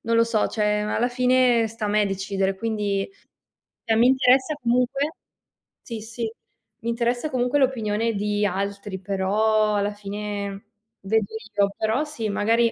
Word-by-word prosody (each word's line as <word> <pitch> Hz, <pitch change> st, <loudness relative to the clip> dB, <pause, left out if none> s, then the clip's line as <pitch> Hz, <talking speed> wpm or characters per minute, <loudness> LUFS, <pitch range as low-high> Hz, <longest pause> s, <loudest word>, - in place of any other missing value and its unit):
non 230 Hz, 0 st, 0 dB
lo 230 Hz, -, +6 dB
so, 230 Hz, -2 st, +1 dB
cioè 210 Hz, -1 st, +1 dB
alla 225 Hz, +3 st, 0 dB
fine 250 Hz, -2 st, +3 dB
sta 220 Hz, -1 st, -4 dB
a -, -, -1 dB
me 210 Hz, 0 st, +3 dB
decidere, 195 Hz, 0 st, -1 dB
quindi, 205 Hz, -2 st, -1 dB, 0.8 s
cioè 225 Hz, -1 st, +2 dB
mi 240 Hz, -, +6 dB
interessa 260 Hz, +2 st, +4 dB
comunque 250 Hz, +5 st, +1 dB, 0.7 s
sì, 230 Hz, -2 st, -6 dB
sì, 230 Hz, +2 st, -6 dB, 0.6 s
m' 230 Hz, -, -7 dB
interessa 240 Hz, +5 st, 0 dB
comunque 250 Hz, +2 st, +1 dB
l'opinione 230 Hz, -4 st, +1 dB
di 205 Hz, 0 st, 0 dB
altri, 200 Hz, 0 st, -3 dB
però 210 Hz, +3 st, +1 dB
alla 205 Hz, 0 st, +1 dB
fine 205 Hz, -1 st, -5 dB, 0.4 s
vedo 215 Hz, +2 st, +1 dB, 0.3 s
io. 200 Hz, -1 st, +2 dB
Però 220 Hz, +6 st, +1 dB
sì, 240 Hz, -8 st, -4 dB
magari, 230 Hz, +3 st, +2 dB
220 Hz, 145 wpm, -24 LUFS, 205-240 Hz, 0.8 s, lo